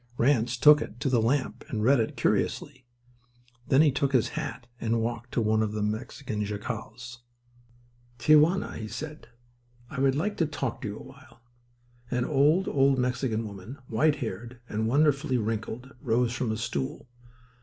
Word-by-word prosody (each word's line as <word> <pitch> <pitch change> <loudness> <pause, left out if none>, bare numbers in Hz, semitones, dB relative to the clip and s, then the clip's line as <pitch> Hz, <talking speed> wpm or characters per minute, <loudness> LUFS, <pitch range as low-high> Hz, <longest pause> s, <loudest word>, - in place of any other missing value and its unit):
Ranse 120 -2 +2
took 150 +3 +7
it 120 - -7
to 135 - +1
the 120 -3 +3
lamp 130 +4 0
and 105 -2 -2
read 135 +3 +5
it 110 - -2
curiously. 130 -3 -1 0.8
Then 135 +3 +5
he 150 - +4
took 135 +1 0
his 125 -4 +3
hat 125 - -5
and 115 0 0
walked 120 +1 -3
to - - +1
one 110 0 +2
of 105 -1 -1
the 105 -1 -2
Mexican 110 +1 -3
jacals. 115 +3 -6 1.0
"Tia 150 +6 +6
Juana," 170 +6 +1
he 110 - -5
said, 150 +5 -7 0.6
"I 135 - -5
would 135 0 +3
like 205 +8 -1
to 165 - +2
talk 135 -5 -3
with - - -7
you 105 - -6
a - - -10
while." 130 -3 -16 0.7
An 125 0 0
old, 150 +7 +3
old 135 -1 +3
Mexican 125 -3 -1
woman, 100 +5 -9
white 145 +6 +2
haired 120 -1 -6
and 110 0 -1
wonderfully 140 0 +2
wrinkled, 115 +3 -3
rose 120 0 +1
from 125 -3 -1
a 110 - -2
stool. 70 - -4
125 Hz, 170 wpm, -27 LUFS, 110-140 Hz, 1.0 s, took